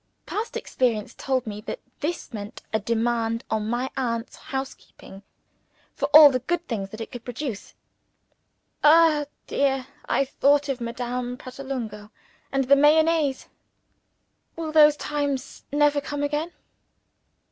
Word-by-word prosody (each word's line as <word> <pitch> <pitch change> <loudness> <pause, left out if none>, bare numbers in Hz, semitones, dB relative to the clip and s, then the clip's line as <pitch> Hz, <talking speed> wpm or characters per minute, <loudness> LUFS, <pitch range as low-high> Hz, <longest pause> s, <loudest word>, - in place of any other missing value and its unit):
Past 440 +2 -3
experience 230 -5 -1
told 260 -2 -1
me 210 -1 -6
that 365 - -6 0.2
this 320 -3 -4
meant 205 -1 -7
a 220 - +2
demand 230 +1 0
on 215 0 -1
my 245 +2 -1
aunt's 230 -3 -2
housekeeping 265 -7 -8 0.7
for - - -1
all 300 -1 +9
the 255 - 0
good 345 +7 -2
things 200 -5 -3
that 215 +3 -9
it - - -7
could 245 -2 -8
produce. 245 -3 -6 1.1
(Ah, 305 -1 +6 0.2
dear! 270 -2 0 0.2
I 275 - +2
thought 285 +2 +2
of 260 -2 -2
Madame 245 +1 -4
Pratolungo 250 -6 -6 0.4
and 270 0 +1
the 275 +2 +5
Mayonnaise. 300 -1 +3 1.1
Will 325 -1 -4
those 300 -1 +6
times 285 -3 -3
never 290 0 +3
come 290 +1 -4
again?) 300 +4 -1
265 Hz, 130 wpm, -25 LUFS, 235-295 Hz, 1.1 s, all